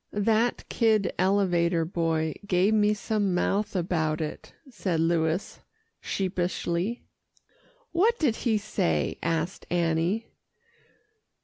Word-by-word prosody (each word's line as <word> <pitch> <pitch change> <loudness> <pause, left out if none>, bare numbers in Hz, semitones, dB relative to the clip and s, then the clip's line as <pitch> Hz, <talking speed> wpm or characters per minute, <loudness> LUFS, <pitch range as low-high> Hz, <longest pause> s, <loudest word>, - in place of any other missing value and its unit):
"That 220 +3 +1
kid 220 -5 +2
elevator 175 -3 +2
boy 160 -2 -1
gave 190 +3 +3
me 210 0 +3
some 205 -2 0
mouth 205 +3 0
about 165 -3 0
it," 155 -2 -5 0.2
said 185 -10 -2
Louis 165 +2 0 0.4
sheepishly. 185 +2 -2 0.9
"What 435 +7 +3
did 270 - +1
he 225 -3 +1
say?" 80 - -1
asked 165 +2 -2
Annie. 170 +5 0
185 Hz, 100 wpm, -27 LUFS, 165-215 Hz, 0.9 s, gave